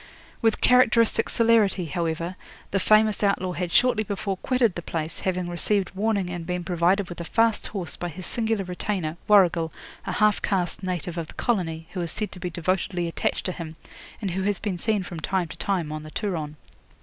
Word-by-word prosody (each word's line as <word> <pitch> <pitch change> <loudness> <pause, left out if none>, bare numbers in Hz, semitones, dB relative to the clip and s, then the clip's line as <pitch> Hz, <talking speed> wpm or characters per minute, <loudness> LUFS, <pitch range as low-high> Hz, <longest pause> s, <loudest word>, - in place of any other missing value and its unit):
'With 225 -1 +2
characteristic 230 -3 +4
celerity, 225 -6 +3
however, 165 +2 -2 0.4
the 195 - +2
famous 215 +2 +4
outlaw 195 -3 +1
had 175 -1 -3
shortly 250 0 +4
before 200 -1 -3
quitted 250 -2 +2
the 175 - -5
place, 165 -1 -4
having 185 -1 -1
received 185 +2 0
warning 200 -2 0
and 175 -1 -4
been 180 +1 -3
provided 180 +3 +2
with 175 0 -7
a - - -3
fast 225 +5 +2
horse 190 -5 -5
by 175 - -4
his 175 +3 -7
singular 225 -1 0
retainer, 180 -3 -2
Warrigal, 175 -6 +5 0.4
a - - -1
half 210 -1 +3
caste 185 -3 -1
native 180 -2 -3
of 165 - -4
the - - -12
colony, 165 -8 -1
who 185 - -2
is 170 - -3
said 215 -1 -3
to 185 - -9
be 180 0 -3
devotedly 175 +1 -1
attached 165 - -2
to 185 - 0
him, 165 -2 -7 0.5
and 195 - -1
who 190 +2 -2
has 200 0 +1
been 190 -3 -3
seen 210 0 0
from 175 -2 -7
time 185 +2 0
to - - -9
time 175 -4 0
on 155 0 -4
the 155 - -9
Turon. 160 -6 -3
185 Hz, 195 wpm, -25 LUFS, 170-210 Hz, 0.5 s, Warrigal